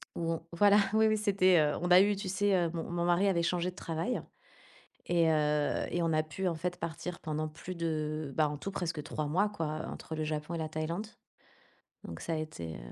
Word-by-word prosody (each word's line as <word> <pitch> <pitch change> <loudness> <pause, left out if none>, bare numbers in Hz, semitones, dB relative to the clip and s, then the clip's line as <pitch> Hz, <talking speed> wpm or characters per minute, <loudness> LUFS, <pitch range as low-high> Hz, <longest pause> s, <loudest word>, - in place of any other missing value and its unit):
où 165 -1 -1
on 165 - -4
voilà, 205 +3 +6 0.2
oui, 220 0 +5
oui, 215 0 +2
c'était, 190 -4 +4
heu 150 -1 +2
on 175 0 -1
a 180 - +9
eu 205 +1 +4
tu 195 -1 -5
sais, 200 +1 +2
heu, 170 -2 +2
mon 165 - -3
mon 175 0 -2
mari 175 +3 +3
avait 170 -3 +2
changé 180 +1 0
de 180 - -10
travail 165 +9 -2 0.9
et 170 -2 +3
heu 150 -1 +1
et 175 - -1
on 165 -1 +1
a 155 0 +3
pu 170 +5 -4
en 170 - -1
fait 180 +2 -3
partir 170 +1 -5
pendant 155 0 -2
plus 180 +4 -8
de, 155 -3 -2
bah, 155 -2 +3
en 145 - -4
tout 195 - -5
presque 165 -5 -3
3 150 +1 -3
mois 190 +8 +2
quoi, 160 -6 -3
heu, - - -4
entre 160 - -7
le 155 - -2
Japon 155 +2 -3
et - - -2
la 160 -1 -2
Thaïlande, 165 +7 -3 1.0
donc 85 - -7
ça 165 - -2
a - - -1
été, 85 - -5
heu - - -10
165 Hz, 235 wpm, -31 LUFS, 155-185 Hz, 1.0 s, a